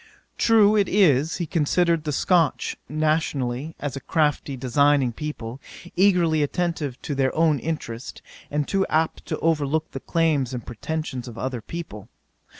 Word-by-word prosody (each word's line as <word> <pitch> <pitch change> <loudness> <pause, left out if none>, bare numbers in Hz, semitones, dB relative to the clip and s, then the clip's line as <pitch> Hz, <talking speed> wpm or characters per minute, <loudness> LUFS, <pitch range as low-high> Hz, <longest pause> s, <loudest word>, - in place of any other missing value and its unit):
True 215 -2 +5
it 200 -3 +2
is, 160 -6 +3
he 175 - -2
considered 165 +1 +1
the 150 - -1
Scotch, 165 +1 +1
nationally, 155 -2 -1
as 145 -2 -4
a - - -4
crafty, 150 -2 0
designing 135 0 +2
people, 130 -3 -6 0.3
eagerly 175 -5 +3
attentive 150 -3 -2
to 150 - -3
their 135 -1 +1
own 155 -3 +3
interest, 130 -6 -5 0.3
and 150 0 -1
too 195 -1 +1
apt 160 +1 0
to - - -2
overlook 155 -1 0
the 135 - -5
claims 145 -5 0
and 120 - -6
pretentions 130 +1 -4
of 120 -1 -9
other 125 -2 -3
people. 110 - -8
150 Hz, 150 wpm, -24 LUFS, 130-165 Hz, 0.3 s, True